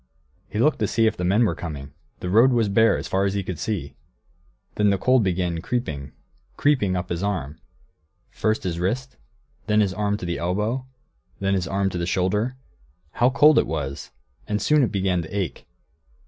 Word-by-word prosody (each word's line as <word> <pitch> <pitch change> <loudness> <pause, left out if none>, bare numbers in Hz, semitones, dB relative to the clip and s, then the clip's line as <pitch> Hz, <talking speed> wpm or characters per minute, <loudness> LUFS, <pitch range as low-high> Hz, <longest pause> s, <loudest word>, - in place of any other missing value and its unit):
He 105 - -5
looked 145 +7 +3
to - - +1
see 115 - +2
if 110 - +2
the 90 - -4
men 100 +6 +3
were - - +1
coming; 70 -4 -7 0.3
the 90 - -3
road 120 +6 +5
was 115 -4 +2
bare 110 +2 +4
as - - -5
far 95 +1 +1
as 100 0 -1
he 100 - -1
could 90 -3 -5
see. 105 -5 -3 0.8
Then 105 -1 +2
the 100 - +2
cold 125 +4 +3
began 90 -3 -1
creeping, 80 - -3 0.5
creeping, 125 -11 +2
up 90 0 -3
his 85 0 -2
arm; 85 -7 -3 0.7
first 110 0 -1
his 85 -3 -2
wrist, 125 +9 -2 0.5
then 105 -1 +3
his 100 -3 +2
arm 105 0 -1
to 95 - -6
the 85 -1 -2
elbow, 105 +9 -1 0.5
then 95 0 0
his 95 -2 0
arm 95 0 0
to 90 - -3
the 85 - -2
shoulder; 105 +8 0 0.5
how 120 +9 +3
cold 150 +3 +6
it - - 0
was! 70 -4 -4 0.4
And 105 0 -1
soon 150 +8 +3
it 120 - +1
began 95 -3 0
to 80 - -8
ache. 85 -10 -4
100 Hz, 195 wpm, -23 LUFS, 90-110 Hz, 0.8 s, cold